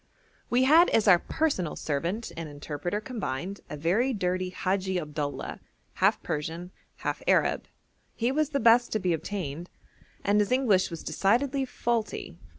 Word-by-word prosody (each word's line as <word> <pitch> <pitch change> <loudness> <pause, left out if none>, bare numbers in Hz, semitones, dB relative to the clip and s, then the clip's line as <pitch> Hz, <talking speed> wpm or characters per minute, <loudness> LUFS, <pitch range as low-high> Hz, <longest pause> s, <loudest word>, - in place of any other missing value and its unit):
We 245 +2 +3
had 320 +6 +6
as 225 -1 +2
our 180 -3 +7
personal 230 - -1
servant 170 +10 -2
and 165 -2 -5
interpreter 145 +6 -4
combined 200 - -4
a 150 - -5
very 200 - +1
dirty 185 -2 -1
Hadji 185 0 -1
Abdullah, 150 -2 -4 0.3
half - - +2
Persian, 165 +3 -4 0.2
half - - -3
Arab. - - +2 0.5
He 235 +2 0
was 305 +1 +1
the 280 -2 0
best 235 +1 +5
to 215 - +1
be 180 -3 +1
obtained, 170 -1 -4 0.5
and 205 +1 +3
his 205 +1 +1
English 235 -8 +3
was 165 -2 -7
decidedly 250 - +1
faulty. 235 -3 -3
195 Hz, 150 wpm, -28 LUFS, 165-235 Hz, 0.5 s, our